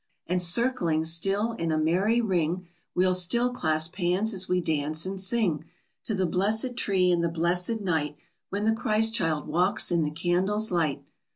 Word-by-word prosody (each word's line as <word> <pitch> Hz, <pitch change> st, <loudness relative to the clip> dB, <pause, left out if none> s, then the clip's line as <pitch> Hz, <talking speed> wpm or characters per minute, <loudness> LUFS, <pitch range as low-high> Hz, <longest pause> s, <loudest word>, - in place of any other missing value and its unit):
_And 180 Hz, +1 st, 0 dB
circling 175 Hz, -4 st, +1 dB
still 195 Hz, +7 st, +1 dB
in 165 Hz, -8 st, -3 dB
a 155 Hz, -, +1 dB
merry 185 Hz, +9 st, +2 dB
ring 180 Hz, -3 st, -1 dB, 0.3 s
We'll 185 Hz, +1 st, +3 dB
still 235 Hz, +8 st, +2 dB
clasp 160 Hz, -5 st, -1 dB
hands 190 Hz, +4 st, +1 dB
as 190 Hz, -1 st, -2 dB
we 180 Hz, 0 st, +2 dB
dance 155 Hz, -1 st, -1 dB
and 190 Hz, 0 st, -3 dB
sing 190 Hz, -6 st, 0 dB, 0.4 s
To 220 Hz, -, -2 dB
the 190 Hz, -1 st, +1 dB
blessed 215 Hz, +8 st, 0 dB
tree 190 Hz, -6 st, +2 dB
and 170 Hz, -1 st, +1 dB
the 170 Hz, -, +1 dB
blessed 180 Hz, +6 st, 0 dB
night 155 Hz, -6 st, -1 dB, 0.3 s
When 200 Hz, +2 st, -3 dB
the 220 Hz, -, +4 dB
Christ 220 Hz, 0 st, +1 dB
child 160 Hz, -8 st, 0 dB
walks 180 Hz, +3 st, +1 dB
in 170 Hz, -1 st, +2 dB
the 150 Hz, -, 0 dB
candles' 185 Hz, +7 st, 0 dB
light! 155 Hz, -5 st, 0 dB
180 Hz, 175 wpm, -27 LUFS, 165-210 Hz, 0.4 s, the